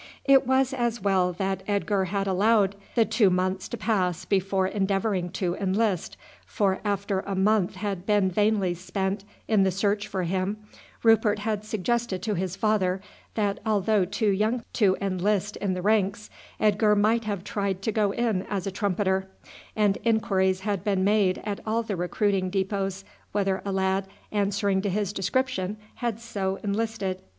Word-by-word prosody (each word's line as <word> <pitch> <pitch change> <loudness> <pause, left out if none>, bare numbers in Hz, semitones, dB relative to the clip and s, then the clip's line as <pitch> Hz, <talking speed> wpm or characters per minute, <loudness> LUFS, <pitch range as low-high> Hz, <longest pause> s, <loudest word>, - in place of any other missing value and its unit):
It 270 -2 +5
was 265 0 +2
as 240 -2 -1
well 185 -2 +2
that 190 +1 -2
Edgar 200 -1 +1
had 195 +2 -1
allowed 200 +1 +3 0.2
the 230 -2 +4
two 210 -4 +3
months 185 +1 0
to 240 - -4
pass 190 -6 0
before 195 -1 +1
endeavouring 195 -1 0
to 180 -3 -1
enlist, 195 0 -1 0.3
for 195 -4 0
after 200 -1 -1
a 195 0 -4
month 195 -1 +2
had 195 -2 -4
been 205 -3 +3
vainly 205 -2 +2
spent 190 +2 -3 0.2
in 215 -3 +3
the 190 - +4
search 200 +2 0
for 190 -2 -2
him, 190 +4 -1 0.5
Rupert 225 -2 +4
had 210 0 -2
suggested 215 -1 -1
to 215 - 0
his 185 -1 -2
father 195 -3 +1 0.4
that 205 -2 0
although 215 -2 +2
too 205 +3 0
young 220 +5 0
to 195 -5 +3
enlist 200 +1 0
in 190 -2 -1
the 180 - -4
ranks 210 0 +1 0.3
Edgar 210 0 +3
might 220 +2 +2
have 200 -4 -3
tried 195 -2 -2
to 220 - 0
go 210 -1 +2
in 225 -4 0
as 195 -3 -2
a 195 - -2
trumpeter, 190 -1 0 0.5
and 205 -2 +2
inquiries 190 -5 +2
had 200 -2 -2
been 195 -2 +1
made 200 -2 +3
at 205 -2 -3
all 225 +1 0
the 215 -3 -3
recruiting 185 +2 0
depôts 195 0 -2 0.3
whether 195 -2 0
a 200 - -2
lad 190 0 0 0.2
answering 200 -1 +1
to 200 - -1
his 205 +1 -1
description 210 0 -1 0.2
had 235 -3 -2
so 195 -5 -2
enlisted. 205 -2 -2
200 Hz, 165 wpm, -26 LUFS, 190-215 Hz, 0.5 s, It